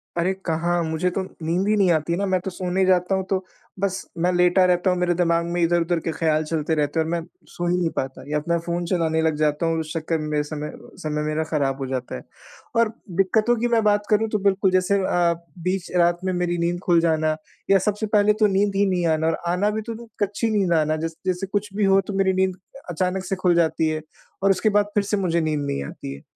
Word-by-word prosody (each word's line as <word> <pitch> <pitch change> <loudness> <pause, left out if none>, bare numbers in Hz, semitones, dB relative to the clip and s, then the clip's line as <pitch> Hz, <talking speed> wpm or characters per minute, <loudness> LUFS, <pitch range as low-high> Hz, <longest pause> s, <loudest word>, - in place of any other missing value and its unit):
अरे! 175 +2 +1
कहाँ 170 +1 0
मुझे 160 +3 0
तो 195 - 0
नींद 175 +1 -2
ही 215 - +3
नहीं 190 -3 +4
आती 160 +1 +1
ना, 200 - 0
मैं 190 -1 +1
तो 190 - -4
सोने 185 +1 0
जाता 185 0 +2
हूँ 190 - -1
तो 190 -1 -1 0.3
बस 190 -1 -2
मैं 175 +2 +2
लेटा 180 +1 +4
रहता 180 0 +2
हूँ, 180 - +1
मेरे 175 -1 +2
दिमाग़ 170 -1 +1
में 175 +1 -2
इधर-उधर 170 0 +2
के 165 - -3
ख़्याल 155 -1 +1
चलते 160 0 -1
रहते 150 +1 0
हैं 160 - +2
और 160 - -4
मैं 170 0 0 0.3
सो 175 - -4
ही 175 +1 +2
नहीं 175 -2 +1
पाता 130 0 -3
या 150 0 +1
त 150 - -10
मैं 170 - +3
फ़ोन 170 +1 -3
चलाने 165 -2 +1
लग 160 -1 +1
जाता 150 +1 +1
हूँ, 165 0 +1
उस 155 -1 -5
चक्कर 165 0 -1
में 155 - -4
मेरा 150 -1 0
समय 150 0 -5 0.3
समय 150 -1 -2
मेरा 155 +1 0
खराब 140 -4 -1
हो 135 - -2
जाता 130 -1 -4
है। 65 - -8 0.5
और 230 -1 +4 0.3
दिक्कतों 215 +5 +3
की 240 +1 0
मैं 230 -2 +2
बात 205 0 +2
करूँ 220 +1 +3
तो 215 - 0
बिल्कुल 195 -1 +2
जैसे 185 +2 +2
अ, 175 -2 +2 0.3
बीच 180 +1 -2
रात 175 0 +3
में 185 - 0
मेरी 175 -1 -1
नींद 170 +1 -1
खुल 175 -2 +4
जाना 155 -2 +1 0.3
या 195 - +6
सबसे 210 +2 -1
पहले 205 +1 +4
तो 210 - +6
नींद 200 0 +1
ही 200 +1 +3
नहीं 180 -2 0
आना 160 0 +1
और 165 - +1
आना 180 +4 +1
भी 215 +1 -2
तो 230 +1 -6
तो 230 0 -11
कच्ची 205 +3 -1
नींद 200 -5 +1
आना, 155 -1 +2
जस 165 +1 -4
जैसे 185 +1 -1
कुछ 205 +1 -2
भी 205 0 +1
हो 195 0 +5
तो 200 - -7
मेरी 195 -1 +2
नींद 190 0 +1
अ, 190 +8 -17
अचानक 180 +2 -1
से 195 - -1
खुल 180 -2 +2
जाती 160 -1 +2
है 155 0 -2 0.4
और 195 - +5
उसके 195 +3 +2
बाद 205 0 +3
फिर 205 - +3
से 205 +1 -1
मुझे 170 -3 +1
नींद 155 -2 -1
नहीं 105 - -2
आती 70 0 -7
है। 70 - -13
175 Hz, 255 wpm, -23 LUFS, 160-195 Hz, 0.5 s, या